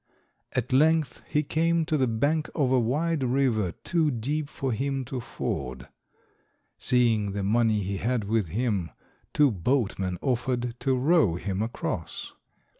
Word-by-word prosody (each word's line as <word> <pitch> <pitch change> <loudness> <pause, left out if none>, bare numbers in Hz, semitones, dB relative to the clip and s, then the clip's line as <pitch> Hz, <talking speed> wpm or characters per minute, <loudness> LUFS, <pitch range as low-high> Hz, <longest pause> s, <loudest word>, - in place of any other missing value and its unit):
At 125 +1 -1
length 155 -1 +3
he 150 - +1
came 165 +2 +1
to 155 - 0
the 130 -3 +2
bank 145 +8 0
of 140 -5 +1
a 130 - +4
wide 145 +6 0
river 120 -8 +1
too 165 -3 +2
deep 145 +4 -2
for 135 -3 -3
him 135 +3 -1
to 130 +1 -4
ford. 65 - -4 0.9
Seeing 115 -5 +2
the 100 0 -2
money 110 +1 +2
he 100 +1 -2
had 120 +2 0
with 105 -1 0
him, 100 -2 -1 0.4
two 145 -3 +4
boatmen 95 -3 0
offered 125 -2 -1
to 135 -2 +1
row 130 - +3
him 95 +2 -3
across. 115 +2 -4
125 Hz, 145 wpm, -27 LUFS, 105-140 Hz, 0.9 s, a